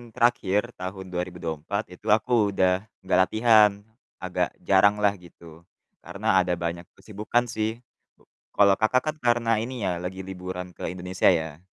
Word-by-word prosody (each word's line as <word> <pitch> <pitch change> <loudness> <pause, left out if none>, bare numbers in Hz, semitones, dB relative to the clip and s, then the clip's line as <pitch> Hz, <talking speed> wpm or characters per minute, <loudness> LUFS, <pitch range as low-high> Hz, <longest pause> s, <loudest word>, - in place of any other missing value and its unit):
terakhir 120 -2 +1
tahun 95 0 -7
2024 90 +2 -4
itu 90 - -13
aku 110 0 +3
udah 90 0 +3 0.2
nggak 95 - +2
latihan, 110 -2 +5 0.5
agak - - -2
jaranglah 100 +1 +4
gitu. 85 -1 -16 0.3
Karena 95 +3 0
ada 90 -1 0
banyak 85 0 -5
kesibukan 105 +3 -2
sih 110 +2 -3
gitu. - - -35 0.3
Kalo, 100 -1 +4
Kakak, 125 +3 +2
kan - - -19
karena 120 -3 +1
ini 120 0 -5
ya 90 -3 -1
lagi 95 +2 -6
liburan 90 -1 -7
ke - - -6
Indonesia 90 0 -1
ya. 80 -4 +1
95 Hz, 145 wpm, -25 LUFS, 90-110 Hz, 0.5 s, latihan